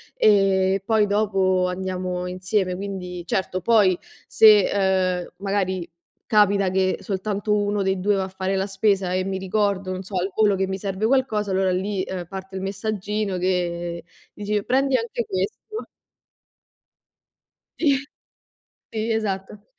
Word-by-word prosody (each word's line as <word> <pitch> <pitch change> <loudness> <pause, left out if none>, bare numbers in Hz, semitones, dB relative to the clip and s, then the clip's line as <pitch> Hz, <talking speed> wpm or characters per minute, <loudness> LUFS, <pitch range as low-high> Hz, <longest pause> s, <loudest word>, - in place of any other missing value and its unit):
e 195 -2 +3
poi 220 -1 +3
dopo 195 -3 +2
andiamo 180 -1 -3
insieme. 185 +1 -1
Quindi, 180 -2 -6
certo, 185 +1 -1
poi 200 -3 +4 0.3
se, 210 -3 +6 0.6
uhm, - - -16
magari 190 -3 -2 0.4
capita 200 -2 +4
che 185 0 +1
soltanto 205 +1 -2
1 205 0 +1
dei 190 -1 0
2 205 +2 +2
va 195 - 0
a - - -4
fare 190 0 -2
la 190 0 0
spesa 195 -2 +1
e 185 0 0
mi 190 0 -2
ricordo, 190 0 -1
non 185 0 -4
so, 195 +1 -8
al 185 +2 -1
volo 210 -2 +3
che 190 0 0
mi 190 0 -3
serve 195 +1 -2
qualcosa, 220 -5 +1
allora 190 0 +2
lì, 190 +1 -1
uhm, 185 -2 -4
parte 190 0 -8
il 190 - -3
messaggino 205 0 -2
che 175 -2 -1 0.3
dici: 205 0 -2
“Prendi 270 +1 +2
anche 235 0 -3
questo”. 200 - -4 1.9
Sì. 285 -4 +3 0.9
Sì, 220 +1 -2
esatto. 205 -2 -3
195 Hz, 145 wpm, -23 LUFS, 185-210 Hz, 1.9 s, se